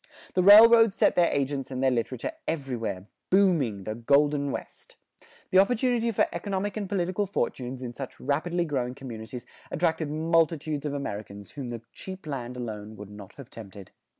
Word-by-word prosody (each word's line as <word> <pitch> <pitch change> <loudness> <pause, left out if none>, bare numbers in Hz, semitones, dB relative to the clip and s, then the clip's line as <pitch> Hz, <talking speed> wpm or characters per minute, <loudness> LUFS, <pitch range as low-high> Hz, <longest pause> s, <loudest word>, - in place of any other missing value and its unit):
The 185 - +2
railroads 225 +2 +8
sent - - +3
their 175 -1 +3
agents 140 -1 -1
and 130 0 -3
their 130 - +4
literature 125 - -2 0.2
everywhere, 120 - -3 0.2
"booming" 165 - +2
the 110 - -4
"Golden 140 +4 +2
West"; - - -8 0.6
the 185 - +6
opportunity 235 +2 +2
for 215 - +2
economic 195 +3 -3
and 205 -3 -4
political 190 +1 -1
fortunes 130 -8 -3
in 120 -1 -5
such 135 +1 -8
rapidly 170 +4 -1
growing 130 -5 -2
communities 120 -2 -8 0.2
attracted 160 -2 0
multitudes 155 -1 0
of 145 - -3
Americans 100 -6 -6
whom 135 -4 -6
the 115 -1 -6
cheap 190 -1 -9
land 125 -4 -5
alone 110 -3 -6
would 105 -1 -10
not 105 -2 -11
have 140 -4 -12
tempted. 100 -3 -11
140 Hz, 160 wpm, -27 LUFS, 120-180 Hz, 0.6 s, railroads